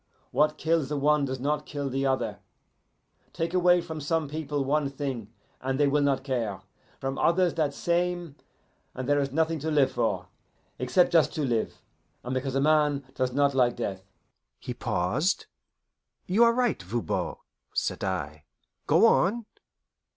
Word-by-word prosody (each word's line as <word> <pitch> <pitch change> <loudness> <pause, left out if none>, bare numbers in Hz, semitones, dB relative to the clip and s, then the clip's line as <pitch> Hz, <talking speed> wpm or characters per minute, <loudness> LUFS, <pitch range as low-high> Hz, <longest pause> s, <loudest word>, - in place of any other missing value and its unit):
What 150 +3 +2
kills 160 -3 +1
the 150 - -1
one 150 0 +3
does 130 -1 -4
not 150 +3 -1
kill 145 -2 -3
the 135 +1 0
other. 120 -6 -1 0.9
Take 165 +1 -2
away 180 -1 +4
from 160 -2 -6
some 160 +1 0
people 145 -1 -3
one 145 +1 +1
thing, 135 -6 -5 0.3
and 130 +1 -2
they 145 - +5
will 145 +1 +2
not 140 -2 +1
care; 115 -8 -2 0.4
from 135 0 -3
others 175 0 +3
that 155 -3 0
same, 175 0 -1 0.6
and 130 -1 -4
there 145 0 +3
is 140 -1 -1
nothing 160 +2 +1
to 160 +3 -3
live 145 -3 +3
for, - - -1 0.5
except 130 +9 +3
just 165 -2 +4
to 155 - -1
live, 120 -4 -2 0.4
and 125 - -4
because 130 0 -2
a - - +3
man 150 -2 +3
does 130 -1 -1
not 140 +2 +2
like 125 -2 +3
death." 95 -1 -4 0.6
He - - -6
paused. 125 - 0 0.8
"You 215 +6 +4
are 235 - +4
right, 245 - +1
Voban," 110 +6 -2 0.4
said - - -1
I. 75 -5 -3 0.4
"Go - - +5
on." 225 +4 +3
145 Hz, 160 wpm, -27 LUFS, 130-160 Hz, 0.9 s, they